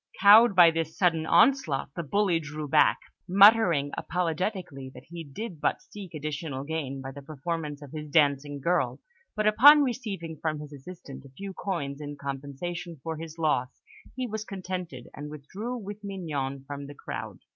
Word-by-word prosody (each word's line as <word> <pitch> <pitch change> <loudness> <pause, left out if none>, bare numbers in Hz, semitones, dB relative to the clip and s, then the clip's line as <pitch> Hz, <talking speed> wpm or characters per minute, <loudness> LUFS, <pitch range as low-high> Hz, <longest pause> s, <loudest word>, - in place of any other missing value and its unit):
Cowed 210 +1 +8
by 175 -2 +8
this 165 -1 -3
sudden 165 -4 +2
onslaught, 230 - +3
the - - -2
bully 180 +2 +1
drew 150 -1 -6
back, 150 +1 +4 0.3
muttering 190 -7 +6
apologetically 175 -5 -3
that 125 - -11
he 170 -1 -7
did 160 +3 -7
but - - +1
seek 195 -5 -11
additional 145 -2 -4
gains 140 -3 -4
by 135 - -6
the 140 - -10
performance 150 0 -5
of 140 - -11
his 150 -1 -7
dancing 145 -1 +2
girl; 140 -5 0 0.4
but 215 -1 0
upon 285 +8 +8
receiving 205 - -4
from 155 -2 -1
his 150 -1 -9
assailant 145 0 -10
a - - -13
few 195 +9 -8
coins 150 -8 -4
in 145 0 -7
compensation 145 +5 -6
for 160 -1 -4
his 165 0 -8
loss, 145 -6 -1 0.3
he 255 0 -2
was 220 -2 -4
contented, 180 - -6
and 150 +1 -7
withdrew 190 - -6
with 205 -1 -8
Mignon 145 -9 -4
from 140 0 -7
the 145 - -10
crowd. - - -6
160 Hz, 165 wpm, -27 LUFS, 145-190 Hz, 0.4 s, Cowed